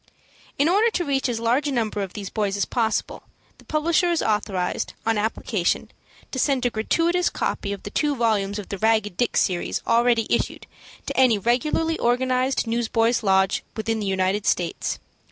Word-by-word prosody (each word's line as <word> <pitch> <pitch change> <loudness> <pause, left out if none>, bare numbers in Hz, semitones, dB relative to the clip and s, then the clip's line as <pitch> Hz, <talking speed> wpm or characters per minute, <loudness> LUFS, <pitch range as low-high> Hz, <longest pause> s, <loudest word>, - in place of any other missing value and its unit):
In 285 - +3
order 410 +7 +4
to 360 -6 -2
reach 270 -2 0
as 235 -2 -2
large 245 +6 +1
a - - -1
number 220 -5 -1
of 195 -2 -5
these 200 -2 -6
boys 205 -2 -1
as 200 - +1
possible, 230 -3 -1 0.4
the - - -18
publisher 330 +3 +1
is 340 -2 +1
authorized, 200 -4 -1
on 225 0 +2
application, 210 -3 -1 0.4
to 260 - -3
send 270 -2 +1
a 245 - +2
gratuitous 335 +11 +1
copy 200 - -2
of 200 - -6
the 205 - -7
two 295 +2 +1
volumes 215 -4 0
of 210 - -7
the 200 - -5
"Ragged 220 -3 +2
Dick 240 - 0
Series" 180 -3 0
already 230 -1 +3
issued, - - -1 0.4
to - - -4
any 255 -4 +4
regularly 300 - 0
organized 255 +2 +1
Newsboys' 230 0 +1
Lodge 190 -2 +2
within 220 +1 -1
the 205 - -3
United 190 +2 0
States. 175 -2 0
230 Hz, 175 wpm, -23 LUFS, 205-265 Hz, 0.4 s, order